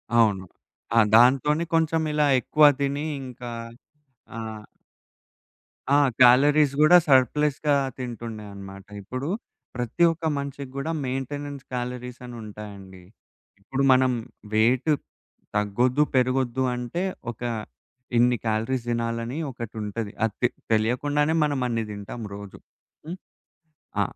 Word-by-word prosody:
అవును. 105 -5 +3 0.5
ఆ - - +8 0.2
దాంతోనే 135 +7 +5
కొంచెం 160 0 +2
ఇలా 150 -1 +3
ఎక్కువ 150 +4 +1 0.2
దిని 140 +2 -1 0.2
ఇంకా 125 -2 -8 0.9
ఆహ్ 110 -1 -7 1.3
ఆ! 145 - +6 0.3
కాలరీస్ 140 +3 +5
కూడా 175 +4 +8
సర్ప్‌లెస్‌గా 145 +3 +3 0.2
తింటుండే 115 -3 -6
అన్నమాట. 95 0 -10 0.2
ఇప్పుడు 130 - -5 0.5
ప్రతి 125 +8 -1
ఒక్క 165 0 -6
మనిషికి 140 -1 -5
గూడా 145 +4 -2
మెయింటెనెన్స్ 140 +2 -4
కాలరీస్ 125 0 -5
అనుంటాయండి. 105 -5 -10 0.6
ఇప్పుడు 135 +6 -2
మనం 130 0 +4 0.4
వెయిట్ 120 +7 +3 0.6
తగ్గొద్దు, 120 +7 +2
పెరగొద్దు 130 0 +1
అంటే 125 +9 -3 0.3
ఒక 115 - -17 0.8
ఇన్ని 120 0 +4
క్యాలరీస్ 115 +3 -1
దినాలని 115 +3 -2
ఒకటుంటది. 110 -3 -5
అది 110 -2 +1
తె - - +7 0.2
తెలియకుండానే 145 +8 +1
మనం 145 -2 0
అన్ని 115 -2 -1
దింటాం 100 +3 -7
రోజు. 100 -1 -10 0.5
హ్మ్. 175 +3 -6 0.8
ఆ! - - +5
125 Hz, 105 wpm, -25 LUFS, 115-140 Hz, 1.3 s, ఆ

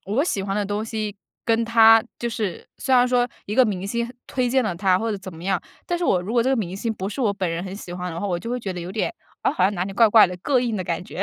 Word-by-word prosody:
我 240 +10 +1
喜 200 - -1
欢 195 0 -2
的 205 - 0
东 205 +2 -2
西 215 -2 -4 0.3
跟 230 0 +2
他 225 -1 +7 0.2
就 240 - -2
是 215 -6 -4
虽 260 -1 +1
然 250 0 +6
说 245 0 +2 0.2
一 210 - -3
个 255 0 +6
明 195 -3 -2
星 235 +3 -2
推 250 -2 0
荐 260 +1 +3
了 185 -5 -1
他 185 -1 +3
或 225 0 -1
者 205 - -2
怎 190 -3 -9
么 165 - -11
样， 190 -3 +1 0.3
但 350 0 -1
是 350 - -1
我 180 - +3
如 210 +5 -5
果 235 -1 +3
这 260 - +1
个 270 - +2
明 190 -4 -3
星 225 +2 -2
不 190 0 -4
是 215 - -5
我 210 -5 +2
本 190 -3 -2
人 165 +1 -3
很 190 0 -6
喜 175 -4 -8
欢 180 -1 -4
的 170 - -5
话， 205 - -2
我 175 -3 -1
就 230 +7 -6
会 250 - -1
觉 195 -4 -4
得 180 - -6
有 175 +2 -6
点， 225 +11 -1 0.3
啊， - - +2
好 185 - +1
像 200 +2 +2
哪 180 0 -1
里 195 - -6
怪 225 +2 +5
怪 215 -1 +7
的， 180 0 -6
膈 265 +6 +2
应 235 -3 -1
的 185 - -3
感 170 +2 -3
觉。 195 - -4
210 Hz, 350 characters per minute, -23 LUFS, 185-235 Hz, 0.3 s, 他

